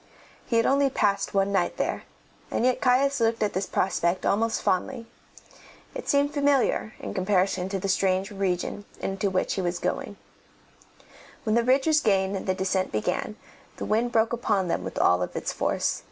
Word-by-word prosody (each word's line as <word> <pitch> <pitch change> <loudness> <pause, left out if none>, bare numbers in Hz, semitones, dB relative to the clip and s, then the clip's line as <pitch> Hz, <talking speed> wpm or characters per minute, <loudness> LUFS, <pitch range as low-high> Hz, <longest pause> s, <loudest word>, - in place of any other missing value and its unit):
He 230 - +1
had 230 - +3
only 275 0 +3
passed 200 -5 0
one 195 0 +2
night 195 - 0
there, - - -2 0.4
and 235 - 0
yet 255 -1 +2
Caius 270 +2 +3
looked 225 -1 +1
at 210 - 0
this 190 +1 -2
prospect 180 -1 0
almost 225 +3 +1
fondly. 230 +6 -1 0.9
It - - -6
seemed 285 0 +2
familiar 280 -6 +1
in - - -6
comparison 185 -1 +1
with 195 -2 -3
the - - 0
strange 190 0 +1
region 195 0 -2
into 195 +1 -1
which 185 -1 0
he 190 - -2
was 175 -1 -1
going. - - -3 1.3
When 215 - 0
the 235 - +4
ridge 265 +2 +3
was 310 -1 +4
gained 195 -4 +1
and 195 - -5
the 185 - +1
descent 185 0 -1
began, 105 - -2 0.4
the - - -4
wind 230 +3 +1
broke 225 0 +2
upon 200 -6 0
them - - -1
with - - -6
all 90 0 +3
its 90 - -3
force. - - -1
200 Hz, 180 wpm, -26 LUFS, 190-240 Hz, 1.3 s, the